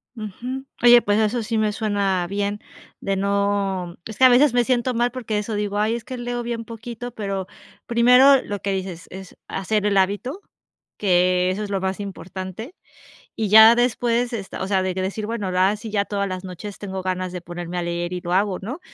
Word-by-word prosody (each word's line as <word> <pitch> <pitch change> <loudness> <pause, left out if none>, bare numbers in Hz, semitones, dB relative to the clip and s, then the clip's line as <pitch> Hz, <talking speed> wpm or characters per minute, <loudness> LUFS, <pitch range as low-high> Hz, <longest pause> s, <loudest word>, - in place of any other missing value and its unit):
Ujú, 245 +5 -6 0.2
oye, 240 0 +8
pues 205 0 +1
eso 220 +2 +1
sí 225 +1 -2
me 215 -1 +1
suena 200 -4 0
bien 200 +2 -2 0.4
de 195 - -1
no 200 -2 -1
es 220 - -8
que 260 - +6
a - - +9
veces 255 +2 +5
me 245 -1 +3
siento 250 0 +1
mal 240 +1 +1
porque 230 -4 -3
eso, 210 +1 -3
digo: 205 0 -2
"Ay, 215 +2 +1
es 235 - -6
que 255 +2 -7
leo 240 0 -3
bien 235 -1 -4
poquito", 235 +1 -7
pero 195 -4 -4 0.4
primero 250 +3 +6
lo 205 -1 -5
que 200 0 -2
dices: 185 -3 -5
"Es 190 0 -11
hacer 210 +2 -1
el 205 - +2
hábito", 205 - 0 0.6
que 180 -1 +2
eso 200 +3 -3
es 205 - -5
lo 195 -1 -1
más 190 +1 -2
importante, 190 - -7 0.6
y 220 -2 -1
ya 220 +2 +9
después, 240 0 +1
esta 195 -3 -5
o - - -2
sea, 190 -2 +2
de 185 -1 -2
que 190 - -3
decir: 200 +3 -3
"Bueno, 215 -4 -3
la 185 +1 +3
a 210 - -2
sí, 215 +1 -8
ya 200 -1 +1
todas 200 -1 -2
las 185 0 -5
noches 190 +2 -8
tengo 190 -2 -5
ganas 185 -1 -2
de 180 - -5
ponerme 175 +1 -6
a - - -1
leer 175 +1 -3
y 180 - -3
lo 175 0 -4
hago, 195 -1 +1
¿no?". 250 - -6
205 Hz, 215 wpm, -22 LUFS, 190-235 Hz, 0.6 s, a